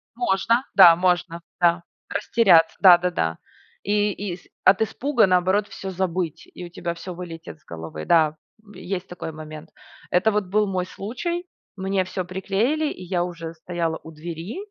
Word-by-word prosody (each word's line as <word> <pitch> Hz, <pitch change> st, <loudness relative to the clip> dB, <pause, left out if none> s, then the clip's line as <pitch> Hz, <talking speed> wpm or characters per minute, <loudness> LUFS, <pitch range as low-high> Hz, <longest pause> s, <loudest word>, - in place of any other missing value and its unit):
Можно, 235 Hz, +1 st, +1 dB
да, 175 Hz, -4 st, +9 dB
можно, 175 Hz, -1 st, 0 dB, 0.2 s
да. 170 Hz, 0 st, +3 dB, 0.3 s
Растеряться, 175 Hz, -8 st, +4 dB
да-да-да. 175 Hz, -, +4 dB, 0.5 s
И 205 Hz, 0 st, +1 dB
и, 190 Hz, -3 st, -5 dB
с 180 Hz, -, -22 dB, 0.2 s
от 195 Hz, +3 st, +5 dB
испуга, 235 Hz, +2 st, +2 dB
наоборот, 185 Hz, +3 st, +2 dB
всё 195 Hz, -, -7 dB
забыть, 180 Hz, -3 st, -3 dB
и 180 Hz, -, -8 dB
у -, -, -10 dB
тебя 170 Hz, 0 st, -4 dB
всё 175 Hz, +2 st, -8 dB
вылетит 165 Hz, -2 st, -9 dB
с -, -, -34 dB
головы. 80 Hz, -2 st, -7 dB
Да, 155 Hz, -2 st, +3 dB, 0.3 s
м, 210 Hz, -, -17 dB
есть 185 Hz, 0 st, -5 dB
такой 180 Hz, -2 st, -7 dB
момент. 155 Hz, 0 st, -10 dB, 0.4 s
Это 190 Hz, +5 st, +3 dB
вот 210 Hz, -2 st, 0 dB
был 210 Hz, +2 st, +1 dB
мой 185 Hz, -2 st, -1 dB
случай, 340 Hz, -, -4 dB, 0.3 s
мне 190 Hz, -1 st, 0 dB
всё 185 Hz, 0 st, -4 dB
приклеили, 205 Hz, -, -1 dB
и 185 Hz, -, -9 dB
я 175 Hz, -1 st, -1 dB
уже 165 Hz, -2 st, -6 dB
стояла 165 Hz, 0 st, -3 dB
у 160 Hz, -, -10 dB
двери. 165 Hz, -, -7 dB
180 Hz, 165 wpm, -23 LUFS, 170-200 Hz, 0.5 s, да